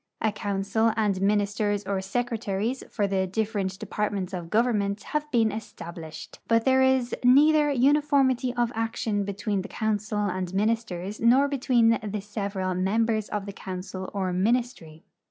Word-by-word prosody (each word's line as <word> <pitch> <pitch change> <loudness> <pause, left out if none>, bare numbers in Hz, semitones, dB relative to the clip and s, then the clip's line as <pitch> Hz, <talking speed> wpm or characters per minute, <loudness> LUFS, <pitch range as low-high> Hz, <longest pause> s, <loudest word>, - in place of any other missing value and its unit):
A 220 - +1
council 205 +2 0
and 205 -4 +1
ministers 205 0 +1
or 195 -1 -1
secretaries 230 +2 -2
for 205 - 0
the 190 -1 0
different 200 -1 -2
de[)art 210 +1 -2
ments 195 -2 -4
of 175 -2 -5
government 210 -2 +1
have 300 0 -3
been 230 -5 +2
established, 165 -7 -8
but 230 0 +2
there 265 0 +4
is 260 -2 +2
neither 295 +4 +5
uniformity 275 -2 +3
of 240 -1 +1
action 225 -2 -1
betAveen 200 0 -2
the 190 - -7
council 215 -1 -2
and 185 -1 -3
ministers 210 -2 -1
nor 255 +5 +5
betAveen 235 -6 +2
the 210 - -2
several 200 -2 -3
members 215 +4 0
of 205 -2 -3
the 200 - -7
council 185 0 -6
or 190 -3 -2
ministry. 195 - -1
210 Hz, 150 wpm, -26 LUFS, 195-235 Hz, -, neither